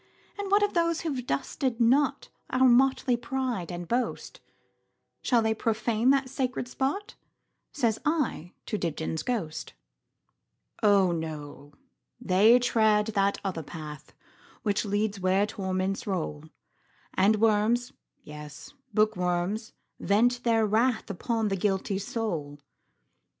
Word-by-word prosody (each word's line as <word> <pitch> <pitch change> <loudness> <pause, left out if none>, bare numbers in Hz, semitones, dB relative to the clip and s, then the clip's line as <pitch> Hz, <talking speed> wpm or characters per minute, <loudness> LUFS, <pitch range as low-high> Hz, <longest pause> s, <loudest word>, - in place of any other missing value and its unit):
And 400 -1 -3
what 405 +1 +4
of 410 - +1
those 335 -1 +1
who 320 -3 -2
've 250 -2 -5
dusted 260 -3 -1
notOur 260 +1 +2
motley 255 0 +4
pride 245 -7 -3
and 175 0 -6
boast,—Shall 240 +1 -4
they 220 0 +2
profane 225 +2 0
that 270 -1 +3
sacred 255 -2 -2
spot?"Says 265 - -4
I 295 - -1
to 210 - -3
Dibdin's 160 -1 -2
ghost."Oh, 165 - -3
no! 150 -3 -6 0.5
they 210 +6 +5
tread 220 -3 +3
that 200 -1 +2
other 185 -4 -3
path, 150 -1 -9 0.5
Which 205 -1 0
leads 205 0 -1
where 190 +2 +2
torments 190 -1 -3
roll, 160 -5 -3 0.7
And 200 +3 +4
worms, 225 +4 +2 0.3
yes, 150 -1 -10 0.2
bookworms, 200 +1 0 0.3
vent 245 +5 +2
their 225 -2 +3
wrathUpon 220 -1 0
the 195 - 0
guilty 195 0 -1
soul. 175 -10 -3
215 Hz, 110 wpm, -27 LUFS, 185-245 Hz, 0.7 s, they